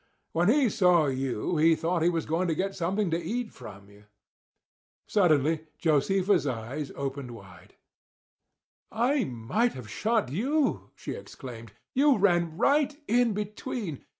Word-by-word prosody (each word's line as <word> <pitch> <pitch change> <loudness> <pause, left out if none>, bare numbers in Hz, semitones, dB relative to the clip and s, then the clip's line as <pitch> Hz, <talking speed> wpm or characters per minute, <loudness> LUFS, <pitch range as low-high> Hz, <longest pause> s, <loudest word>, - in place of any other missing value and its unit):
When 175 +4 +2
he 270 +2 +4
saw 180 -7 +4
you 135 +3 -1
he 160 +1 +5
thought 165 +2 -1
he 170 - +4
was 165 -2 -1
going 165 +4 0
to 165 - 0
get 195 +4 -1
something 190 +1 -1
to 165 +1 0
eat 225 +6 -3
from 100 -1 -12
you." 105 +1 -19 1.0
Suddenly 160 -4 +2
Josefa's 180 +3 +2
eyes 130 +4 -4
opened 140 -1 -4
wide. 100 -8 -13 1.2
"I 245 +2 +1
might 130 - -1
have 110 -4 -9
shot 220 - 0
you!" 275 - 0
she - - -7
exclaimed. 115 -4 -9 0.2
"You 280 0 +4
ran 175 -5 +2
right 290 0 +2
in 240 -1 +3
between. 210 - -5
170 Hz, 140 wpm, -28 LUFS, 140-215 Hz, 1.2 s, he